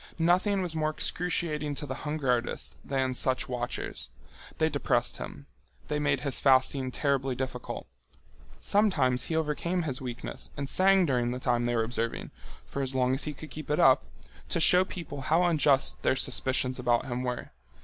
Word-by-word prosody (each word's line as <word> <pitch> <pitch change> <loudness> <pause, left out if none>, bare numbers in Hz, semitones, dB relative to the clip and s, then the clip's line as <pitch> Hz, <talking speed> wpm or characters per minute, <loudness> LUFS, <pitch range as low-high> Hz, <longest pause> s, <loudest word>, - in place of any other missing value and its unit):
Nothing 185 +4 +2
was 170 -3 -3
more 155 -1 +1
excruciating 155 -2 -2
to 145 - -2
the 135 - -4
hunger 150 -1 -2
artist 120 -1 -2
than 130 -1 -1
such 130 +1 +1
watchers. 125 -1 -4 0.5
They - - +3
depressed - - 0
him. 70 - -8 0.4
They 150 - 0
made 145 -3 +1
his 140 -3 -1
fasting 130 0 +3
terribly 135 -1 0
difficult. 130 -1 -5 0.7
Sometimes 140 - +2
he 160 - -2
overcame 160 +3 -1
his 135 -5 -3
weakness 120 -2 -5
and 140 0 -3
sang 190 +3 +5
during 125 -5 +1
the 125 +1 -3
time 120 -2 +1
they 120 0 0
were 115 - +2
observing, 115 0 -2 0.3
for 140 - -4
as 130 -1 -3
long 130 0 +2
as 135 - 0
he 150 - -3
could 155 +1 -10
keep 155 +1 -7
it 150 - +1
up, 130 -1 +6 0.5
to - - 0
show 180 +3 +6
people 165 -7 -7
how 160 +6 +2
unjust 150 -5 +2
their - - +2
suspicions 130 0 +1
about 120 0 +1
him 125 -1 -3
were. 125 -1 -4
135 Hz, 175 wpm, -29 LUFS, 125-155 Hz, 0.7 s, up